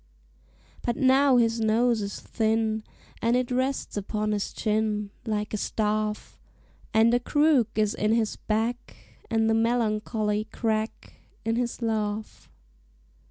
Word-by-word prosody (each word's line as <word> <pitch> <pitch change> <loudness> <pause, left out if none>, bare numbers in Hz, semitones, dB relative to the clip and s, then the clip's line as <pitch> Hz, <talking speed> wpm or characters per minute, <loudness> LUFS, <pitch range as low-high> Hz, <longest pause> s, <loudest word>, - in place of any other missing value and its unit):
But 240 - -1
now 270 -1 +5
his 230 -1 +2
nose 225 +1 +2
is 200 0 -4
thin, 220 0 0 0.4
And 230 +1 +2
it 250 0 0
rests 260 +2 -1
upon 210 +1 -2
his 205 -1 -1
chin 210 -1 -1 0.2
Like 210 -1 -2
a - - 0
staff; 215 0 -2 0.5
And 225 +2 +4
a 245 - +4
crook 290 -2 +3
is 215 -1 +2
in 210 +1 0
his 225 -2 +1
back, 225 +3 -2 0.3
And 225 -1 +2
the 225 - +3
melancholy 215 -2 0
crack 220 0 -3 0.2
In 225 0 +1
his 240 0 -2
laugh. 215 -1 -3
220 Hz, 130 wpm, -26 LUFS, 215-235 Hz, 0.5 s, now